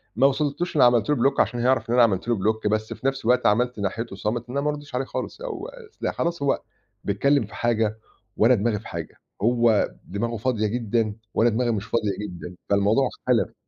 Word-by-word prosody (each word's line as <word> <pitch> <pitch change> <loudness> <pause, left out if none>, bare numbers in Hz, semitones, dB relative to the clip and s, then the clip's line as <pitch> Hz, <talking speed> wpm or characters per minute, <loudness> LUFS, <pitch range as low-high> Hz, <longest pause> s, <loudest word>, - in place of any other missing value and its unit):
ما 135 - +5
وصلتوش 150 +5 -1
إنّي 140 - +5
عملت 120 -2 +3
له 150 - +4
Block 135 +2 +2
عشان 120 - +1
هيعرف 120 -1 +1
إن - - +1
أنا 125 - +7
عملت 100 -3 +1
له 120 - +2
Block، 110 +2 0
بس 110 +1 -1
في 135 - -3
نَفْس 135 -3 -2
الوقت 125 +1 +3
عملت 120 +2 +1
ناحيته 100 +1 -3
صامت 110 +5 -3
إن 125 - -6
أنا - - +1
ما 150 - 0
أردّش 145 -3 -6
عليه 130 +1 -1
خالص - - -5
أو 445 -5 -5
أص - - -14
لأ، - - 0
خلاص 170 -3 -2
هو 140 - +1 0.4
بيتكلِّم 135 +6 +2
في 100 - -13
حاجة 110 -2 0 0.4
وأنا 120 +4 +5
دماغي 105 0 0
في 110 - -12
حاجة، - - -6 0.3
هو 115 -1 +3 0.2
دماغه 115 +4 -3
فاضية 110 -1 0
جدًا 115 -1 -1 0.2
وأنا 120 - +4
دماغي 120 +2 0
مش 105 -3 -2
فاضية 110 -2 0
جدًا، 90 -3 -7
فالموضوع 105 +6 +3
اختلف. 125 -1 0
120 Hz, 215 wpm, -24 LUFS, 105-135 Hz, 0.4 s, أنا